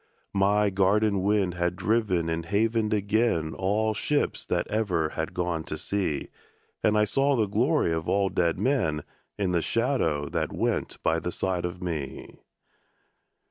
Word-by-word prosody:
My 100 +1 +3
garden 100 +1 +2
wind 100 -2 +1
had 85 0 -1
driven 95 -3 +1
and 80 0 -2
havened 110 +3 +1
again 100 -6 +1
All 105 +3 0
ships 145 +7 -1
that - - -1
ever 90 -8 0
had 80 0 -4
gone 90 -2 -1
to 75 - -4
sea, 90 -3 -2 0.5
And 105 0 +3
I 105 - +4
saw 135 +6 +2
the 110 -4 +2
glory 115 - +1
of 80 0 -2
all 100 -1 +2
dead 85 -2 +1
men 105 - 0 0.3
In 95 -3 0
the 85 -2 +2
shadow 100 - 0
that - - -2
went - - -1
by 80 - +2
the 90 - -3
side 90 -1 -1
of 90 +1 -5
me. 80 -6 -5
95 Hz, 155 wpm, -27 LUFS, 85-110 Hz, 0.5 s, I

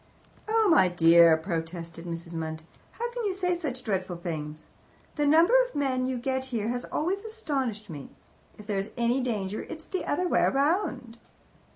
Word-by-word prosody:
"Oh, 445 -1 +3
my 190 - +6
dear!" 170 -1 +6
protested 165 0 -5
Mrs. 170 0 -6
Munt. 160 -1 -4 0.3
"How 475 +1 -4
can 480 -1 -4
you 395 -3 -1
say 360 -2 0
such 295 -8 -4
dreadful 190 -4 -2
things! 155 -3 -6 0.5
The 295 -1 0
number 330 +9 +5
of - - -9
men 260 -3 0
you 260 -1 -2
get 260 +1 -2
here 230 -4 -2
has 245 +1 -3
always 380 +6 -2
astonished 270 - -3
me. 150 -6 -8 0.5
If 210 - -12
there 205 -2 -1
is 195 - -5
any 240 +2 +1
danger 210 -5 -2
it's 315 0 -8
the 375 - -4
other 360 +5 0
way - - +2
round." 270 - 0
245 Hz, 175 wpm, -27 LUFS, -, 0.5 s, my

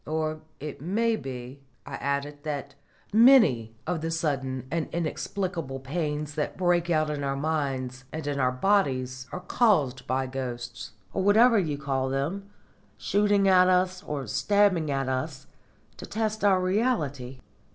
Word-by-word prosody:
"Or 155 0 -2 0.2
it 150 -3 -7
may 225 +8 +1
be," 130 - -7 0.2
I 140 - -9
added, 140 +1 -3
"that 145 -3 -4 0.4
many 205 - +5
of 175 -1 -2
the 165 - -2
sudden 135 -6 -2
and 165 -1 -1
inexplicable 170 -3 -3
pains 150 +1 -3
that 150 -1 -3
break 175 -1 +2
out 155 -2 +2
in 145 -1 -3
our 135 0 -1
minds 135 -4 -2
and 160 -1 -5
in 145 -1 -2
our 125 -1 +2
bodies 130 -6 0
are 180 - -5
caused 160 - +1
by 130 +1 0
ghosts, 120 -4 -6 0.2
or - - 0
whatever 220 +4 +5
you 155 -6 -1
call 135 -2 -1
them, 165 +10 -2 0.5
shooting 205 -1 +2
at 185 -1 +6
us, 185 0 +2
or 145 -7 -4
stabbing 180 +3 +2
us, 130 0 -2 0.5
to - - -9
test 215 -1 -2
our 195 -2 +5
reality." 185 - -1
150 Hz, 145 wpm, -27 LUFS, 135-185 Hz, 0.5 s, at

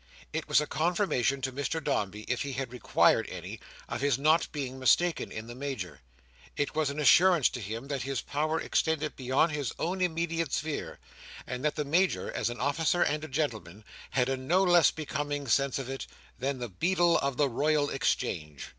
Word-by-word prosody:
It - - -3
was - - +5
a 150 - 0
confirmation 155 - 0
to 130 - -1
Mr 140 +4 -2
Dombey, 105 -3 -1
if 125 +2 -2
he 140 -1 -3
had 130 -1 -4
required 125 - +3
any, - - -7 0.3
of - - -4
his 140 -3 +2
not 155 +4 +3
being 130 -3 -5
mistaken 170 +6 +2
in 110 - -6
the 120 - -8
Major. 130 - -5 0.6
It 145 - -1
was 155 -2 +1
an 140 +2 -4
assurance 170 +1 +6
to 120 - -6
him 115 +6 -5
that 140 -3 -2
his 135 -1 -2
power 155 +3 -1
extended 155 -2 0
beyond 130 +5 +1
his 145 -4 -2
own 185 +3 -2
immediate 165 -3 -1
sphere; 155 -1 -3 0.5
and 125 +1 -5
that 150 - +1
the 150 - -2
Major, 175 +6 +1
as 115 - -1
an 120 - -6
officer 155 +6 +2
and 150 +1 -1
a - - -5
gentleman, 115 - -3 0.3
had 125 -2 +1
a 135 - 0
no 165 +9 +2
less 175 -2 +6
becoming 145 -2 -3
sense 135 +3 +2
of 135 -3 -4
it, 135 0 -5 0.3
than 135 +1 -1
the 125 -1 -4
beadle 175 - +2
of 140 -2 -2
the 145 - +3
Royal 145 +3 +1
Exchange. 75 - -2
140 Hz, 190 wpm, -29 LUFS, 130-160 Hz, 0.6 s, assurance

